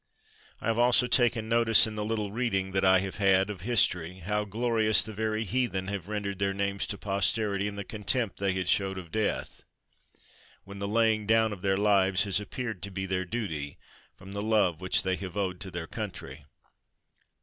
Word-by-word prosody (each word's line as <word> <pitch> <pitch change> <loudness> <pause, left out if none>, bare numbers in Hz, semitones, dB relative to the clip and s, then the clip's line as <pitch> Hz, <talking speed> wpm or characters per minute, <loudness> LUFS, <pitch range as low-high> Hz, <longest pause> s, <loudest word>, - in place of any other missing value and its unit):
I - - -9
have 115 +1 +1
also 125 +1 +5
taken 120 -2 +2
notice, 115 0 +5
in 110 - -5
the 105 - -3
little 105 -2 -2
reading 100 -5 -1
that 95 0 0
I 95 0 +5
have 95 -1 -5
had 95 0 +3
of 95 -4 -9
history, 90 -6 +1
how 105 +4 -2
glorious 110 0 +2
the 110 - -7
very 110 +1 -1
heathen 110 -4 -1
have 100 -2 -5
ren 105 -1 -3
dered 100 -1 -4
their 100 0 0
names 100 0 -1
to 100 - -3
posterity 100 +1 0
in 105 - -5
the 100 - -5
contempt 110 +2 -2
they 100 -1 +1
have 95 -1 -3
showed 95 0 +1
of 85 -3 -9
death 110 -1 -2 0.5
— - - -27
when 100 0 -10
the 100 - -3
laying 110 -1 +2
down 110 -1 +3
of 95 - -10
their 95 0 +1
lives 100 -2 +3
has 100 -1 +1
appeared 110 0 -5
to 100 - -5
be 95 0 -4
their 95 0 -2
duty 85 -10 -4 0.2
— - - -30
from 95 +1 -11
the 100 - -3
love 105 -6 +1
which 95 0 +1
they 95 -1 0
have 95 -1 -7
owed 95 -3 -2
to 100 - -6
their 85 -2 -5
country. 70 -2 -7
100 Hz, 205 wpm, -28 LUFS, 95-110 Hz, 0.5 s, also